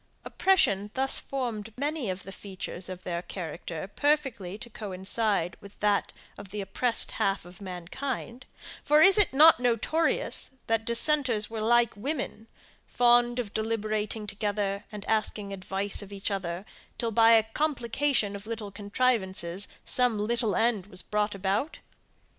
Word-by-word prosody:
Oppression 210 - +2
thus 265 0 +4
formed 230 -5 -4
many 290 -4 -2
of 185 0 -4
the 195 - -9
features 190 -2 -6
of 185 -1 -7
their 170 -1 -3
character 175 -1 -6
perfectly 250 -7 0
to 220 - -9
coincide 200 -3 -1
with 200 0 -14
that 205 -1 +1 0.3
of 200 -1 -10
the 210 +2 -5
oppressed 225 +5 +1
half 195 -2 0
of 180 +2 -13
mankind; 230 +7 -5 0.4
for 300 +1 +5
is 390 +2 +7
it 415 - +5
not 310 +3 +7
notorious, 250 +4 +1
that 225 -1 0
dissenters 235 -3 +2
were 225 -1 -4
like 235 +1 +3
women, 250 -1 -4 0.4
fond 240 0 +4
of 230 -5 -3
deliberating 215 -1 -2
together, 205 -1 -2
and 210 -1 -7
asking 210 -2 -1
advice 195 +2 -2
of 200 -1 -10
each 200 +1 -3
other, 185 -1 -3 0.3
till 230 -1 -1
by 225 +1 +6
a 225 -1 +6
complication 240 -3 0
of 200 +1 -9
little 220 -3 -5
contrivances, 200 -4 0 0.2
some 250 -3 +2
little 220 +1 0
end 225 -5 +1
was 185 -2 -9
brought 210 0 -1
about? 200 +9 -1
215 Hz, 145 wpm, -28 LUFS, 195-240 Hz, 0.4 s, is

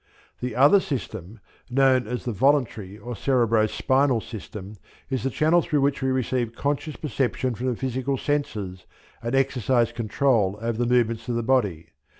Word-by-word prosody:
The 125 -2 -4
other 145 +10 +6
system, 115 - -5 0.3
known 130 -2 +3
as 125 +2 -4
the 120 - -1
Voluntary 115 -5 +1
or 120 +2 -7
Cerebro 115 -5 +2
spinal 130 +2 +2
system, 105 -2 -9 0.3
is 130 -3 0
the 135 - 0
channel 160 +5 +3
through 150 -3 0
which 140 0 +1
we 130 - +1
receive 125 -2 -1
conscious 145 +3 -2
perception 130 -3 -1
from 120 +3 -4
the 125 - 0
physical 130 +2 -2
senses 105 -11 -3 0.3
and 120 +3 -2
exercise 125 -3 +2
control 115 -3 +1
over 115 0 -2
the 120 0 +1
movements 115 -1 +1
of 120 - 0
the 120 - -1
body. 105 -11 0
125 Hz, 160 wpm, -24 LUFS, 115-135 Hz, 0.3 s, other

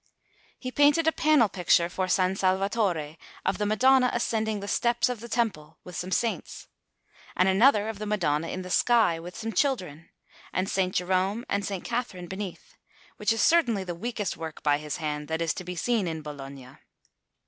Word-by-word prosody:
He 255 - -6
painted 290 +4 +4
a 320 - +4
panel 305 -7 +4
picture 175 -3 +2
for 185 +1 -2
S. 185 - +2
Salvatore, 190 -3 0 0.3
of 190 - 0
the 210 - 0
Madonna 255 +4 +4
ascending 220 -2 -1
the 200 - -7
steps 235 +3 +1
of 250 -3 -3
the 235 +2 -9
Temple, 165 -11 -2
with 180 - -10
some 180 +1 -4
saints; 230 +4 -2 0.7
and 185 - +3
another 210 +2 +4
of 220 -2 -5
the 210 - -4
Madonna 165 -7 0
in 185 +2 -4
the 180 - -8
sky, 220 -7 +3
with 175 +2 -9
some 225 0 -4
children, 180 - -1 0.4
and 185 - 0
S. 190 -1 0
Jerome 190 +5 0
and 200 - 0
S. 190 -3 -3
Catherine 230 -7 -4
beneath, 195 - -7 0.4
which - - +1
is 225 -1 +1
certainly 240 - +3
the 180 -2 -5
weakest 210 +2 -3
work 160 -1 -8
by 145 -1 +3
his 150 -1 -5
hand 150 -2 -4
that 160 +1 -2
is 165 -3 0
to - - -7
be 180 0 -6
seen 220 +2 0
in 160 -2 -4
Bologna. 135 -3 -9
190 Hz, 185 wpm, -27 LUFS, 170-230 Hz, 0.7 s, painted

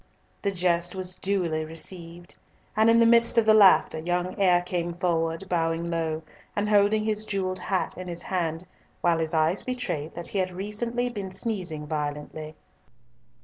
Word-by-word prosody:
The 200 - 0
jest 175 -1 +1
was 185 -1 +1
duly 175 -5 -1
received, 170 +2 -3 0.4
and 220 +1 +4
in 230 - +5
the 230 - +5
midst 235 +1 +5
of 230 - +5
the 215 - +6
laughter, 195 -6 +5
young 175 +2 -2
Eyre 180 -2 +4
came 175 -1 -3
forward, 165 0 -1
bowing 165 -1 -1
low, 160 -1 -2 0.3
and 205 0 0
holding 205 +1 +3
his 215 0 -1
jewelled 190 -3 -2
hat 185 +1 -2
in 185 0 -8
his 170 -1 -4
hand, 170 -3 -2 0.4
while 170 -1 +2
his 160 0 -1
eyes 160 +4 +2
betrayed 170 - -4
that 170 0 -2
he 200 - -2
had 185 -1 0
recently 210 +6 -1
been 200 -4 -5
sneezing 185 -7 -3
violently. 150 +1 -5
180 Hz, 165 wpm, -26 LUFS, 165-200 Hz, 0.4 s, the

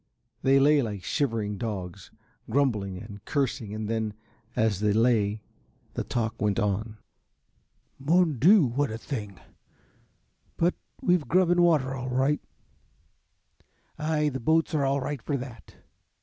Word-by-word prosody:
They 135 +1 +4
lay 145 +1 +5
like 105 -6 -4
shivering 110 -8 -1
dogs, 100 -4 -5 0.4
grumbling 110 -7 0
and 100 +1 -10
cursing 135 -6 -1
and 110 0 -4
then, 110 -1 -2 0.4
as 110 -4 +1
they 105 -1 +2
lay, 110 -2 +2 0.5
the - - -2
talk 115 -2 -3
went 105 -1 +1
on. 105 +1 -1 1.0
"Mon 160 -1 +2
Dieu! 180 - +6
What 130 +3 0
a 110 - -4
thing 105 -6 -6 1.2
but 170 +2 +2 0.3
we've 175 -4 +2
grub 180 -1 +3
and 175 - +3
water 150 -6 +3
all 130 -1 -4
right." 135 +4 +1 1.6
"Ay, 150 -1 +1
the 135 -2 -4
boats 160 +7 +2
are 145 -3 +2
all 135 +1 +1
right 140 -1 -4
for 140 +5 -2
that." 125 -5 -10
125 Hz, 135 wpm, -27 LUFS, 105-145 Hz, 1.6 s, Dieu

